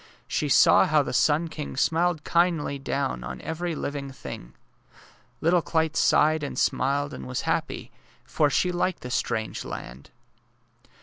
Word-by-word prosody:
She - - -1
saw - - +6
how - - +3
the - - -5
sun 155 +3 +3
king 150 -4 -7
smiled 165 +1 +1
kindly 170 -5 +1
down 135 - -2
on 65 +1 -6
every 165 +1 -3
living 140 -1 -4
thing. 60 - -9 0.9
Little 170 +2 +3
Clyte 160 -1 0
sighed 155 0 +3
and 145 - -5
smiled 140 +2 0
and - - -7
was 125 0 -3
happy, - - -2 0.3
for 150 -2 +1
she 180 +5 +1
liked 180 0 -1
the 125 - -7
strange 110 -2 -2
land. 65 +3 -8
150 Hz, 145 wpm, -26 LUFS, 135-165 Hz, 0.9 s, saw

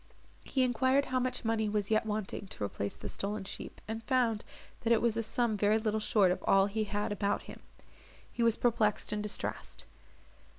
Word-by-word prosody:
He 265 - +1
enquired 260 +3 +3
how 255 0 0
much 250 -1 -2
money 220 -1 +1
was 205 0 -1
yet 220 0 +2
wanting 210 -2 -3
to 105 - -6
replace 100 0 -3
the - - -7
stolen 205 +1 -3
sheep, 195 - -8
and 225 +1 -4
found, 240 -5 +1 0.4
that 230 - -1
it 230 - +6
was 235 -2 +1
a 230 - +1
sum 230 0 0
very 210 +1 +3
little 220 -1 0
short 210 -3 +3
of 180 - -2
all 195 0 +6
he 215 +2 -1
had 205 0 -2
about 205 0 0
him. - - -10 0.7
He - - -4
was 230 -1 +3
perplexed 225 -4 +1
and 210 - -1
distressed. 210 0 -4
215 Hz, 195 wpm, -32 LUFS, 205-235 Hz, 0.7 s, it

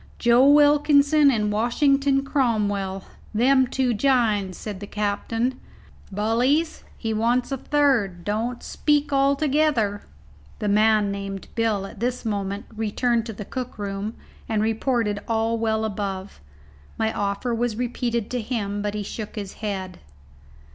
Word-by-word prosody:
"Joe 240 +3 +5
Wilkinson 290 0 +5
and 210 -5 +1
Washington 275 +5 +2
Cromwell 205 -8 0 0.3
them 260 +3 +4
two 255 -1 0
jines," 215 -7 +1
said 205 -3 -6
the 205 - -7
captain. 225 +5 -2 0.5
"Bullies, 245 - +1
he 225 -1 -2
wants 240 +4 +1
a 270 - -1
third. 245 -11 +1
Don't 225 +5 -2
speak 295 -1 0
all 275 +1 +3
together." 280 -8 +1 0.6
The 210 - -3
man 210 0 +3
named 195 -1 -6
"Bill" 220 -4 0
at - - -11
this 250 +1 -2
moment 200 -1 -3
returned 225 +2 0
to 225 - -5
the 210 0 -7
cook 255 +2 -6
room, 205 +1 -4 0.3
and 215 -1 +1
reported 225 -1 0
all 225 0 0
well 220 -1 0
above. 195 -2 -5 0.6
My 220 0 0
offer 200 +4 -2
was 235 -1 -1
repeated 235 -2 -2
to 250 -1 -1
him, 205 -3 -3
but 205 0 -2
he 210 - -2
shook 210 +2 -7
his 200 -3 -6
head. 190 -3 -4
225 Hz, 140 wpm, -24 LUFS, 205-255 Hz, 0.6 s, Joe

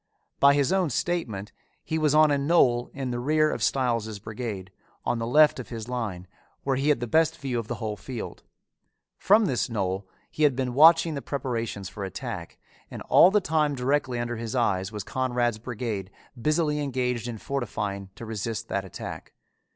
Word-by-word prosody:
By 140 0 +6
his 145 +5 +2
own 185 -4 +2
statement 120 - -2 0.3
he 160 - -2
was 150 -1 +2
on 155 -1 +6
a 145 - +3
knoll 140 -5 +3
in 135 -2 -4
the 120 - -2
rear 155 +4 +2
of - - -4
Stiles' 115 -5 0
brigade, 105 -3 -6 0.3
on 120 - 0
the 115 - -2
left 150 +3 +5
of 125 - -7
his 115 -2 -6
line, 110 -8 -4 0.4
where 135 -1 +1
he 135 +3 +1
had 150 - +2
the - - 0
best 160 +6 +2
view 130 -4 -2
of 115 - -6
the 120 - -3
whole 110 -2 -4
field. 120 +4 -7 0.8
From 210 +3 +5
this 130 - 0
knoll 95 -3 -2 0.2
he - - -6
had 145 -4 +4
been 130 -1 -2
watching 165 +3 +6
the 140 - -4
preparations 115 -9 -3
for 100 +1 -7
attack, 95 - -6 0.3
and - - -7
all 180 - +8
the 210 +1 +3
time 150 -3 +1
directly 130 0 0
under 120 0 -3
his 115 +1 -4
eyes 100 -5 +1
was 105 -2 -5
Conrad's 120 -2 -1
brigade 110 -5 -4 0.3
busily 150 +4 +1
engaged 125 -4 -1
in 120 -2 -5
fortifying 105 -6 -3
to 115 - -8
resist 110 0 -4
that 100 - -1
attack. 95 - -8
125 Hz, 185 wpm, -26 LUFS, 110-145 Hz, 0.8 s, all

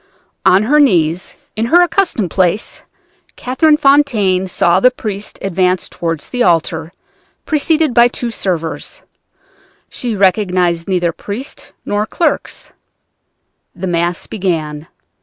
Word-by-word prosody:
On 190 +3 +5
her 295 +7 +3
knees, 175 - +2 0.2
in 220 +2 -1
her 350 +6 +5
accustomed 350 - 0
place, 185 +2 0 0.5
Catherine 300 +5 +2
Fontaine 240 -11 +2
saw 175 0 +2
the 250 - +5
priest 210 -5 -5
advance 185 -1 0
toward 165 -3 -4
the 250 - -5
altar, 165 -3 +1 0.5
preceded 310 -2 +1
by 235 0 +6
two 240 -1 -4
servers. 170 -7 -4 0.9
She 240 -3 -3
recognized 180 -3 +1
neither 180 -3 0
priest 220 - -8
nor 205 +1 -1
clerks. 340 - -2 1.0
The 190 - -5
Mass 175 -1 -1
began. 160 -6 -3
195 Hz, 115 wpm, -15 LUFS, 175-250 Hz, 1.0 s, by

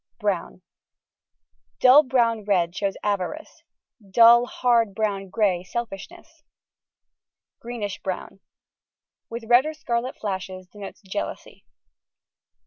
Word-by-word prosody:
Brown: - - -3 1.2
dull 260 +3 +8
brown 235 -5 +1
red 180 -4 +1
shows 200 0 -2
avarice; 205 - -3 0.5
dull, 235 +4 +6
hard 230 -6 +1
brown 200 -3 -2
grey 185 -3 +1
selfishness; 235 - -7 1.2
Greenish 230 -5 -6
Brown: 190 +1 -5 0.9
with 230 0 -6
red 245 +5 +5
or 310 - -5
scarlet 240 -2 -3
flashes, 190 -2 -5
denotes 205 +2 -11
jealousy. 195 +1 -6
215 Hz, 95 wpm, -24 LUFS, 195-240 Hz, 1.2 s, dull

